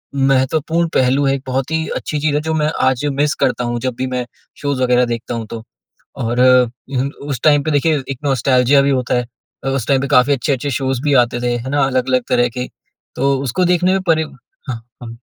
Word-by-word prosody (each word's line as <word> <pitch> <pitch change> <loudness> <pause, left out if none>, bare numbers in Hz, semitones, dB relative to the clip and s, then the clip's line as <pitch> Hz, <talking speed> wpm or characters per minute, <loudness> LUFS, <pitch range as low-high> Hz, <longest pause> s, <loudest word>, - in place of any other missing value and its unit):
महत्वपूर्ण 140 +5 +1
पहलू 130 +2 +3
है, 135 0 +2
एक 135 - -7
बहुत 130 +3 -2
ही 160 0 -1
अच्छी 150 - -3
चीज़ 145 0 0
है 150 - +1
जो 160 +1 -2
मैं 150 -1 +1 0.2
आज 130 +2 +1
मिस 145 0 +2
करता 125 -1 +1
हूँ 120 0 -2
जब 130 -2 -2
भी 130 - -2
मैं 125 -1 -3 0.4
शोज़ 140 -3 -1
वगैरह 125 0 +3
देखता 120 0 -4
हूँ 115 -1 -4
तो। 115 +1 -7 0.5
और 120 +1 -1
उ 125 +1 +2 0.2
उस 135 -5 -3
टाइम 145 -2 +5
पे 155 - -1
देखिए 150 +1 +2
एक 135 - -4
नॉस्टेल्जिया 135 0 +3
भी 140 - +1
होता 130 -2 0
है 125 -1 0 0.4
अ, 135 - -1
उस 135 -4 -1
टाइम 135 -2 +3
पे 140 - -2
काफ़ी 140 0 +4
अच्छे-अच्छे 140 0 -1
शोज़ 130 -1 -2
भी 145 -1 +2
आते 120 0 -5
थे 120 0 0
है 120 +3 -5
ना 145 0 +1
अलग-अलग 130 -1 +1
तरह 120 0 +2
के, 125 +1 -5 0.5
तो 140 +1 +2
उसको 140 +7 0
देखने 180 +1 +2
में 190 - +1
परि 160 -1 +3 0.5
हाँ, 115 -2 -5 0.2
हाँ। 115 -1 -8
130 Hz, 220 wpm, -17 LUFS, 125-145 Hz, 0.5 s, टाइम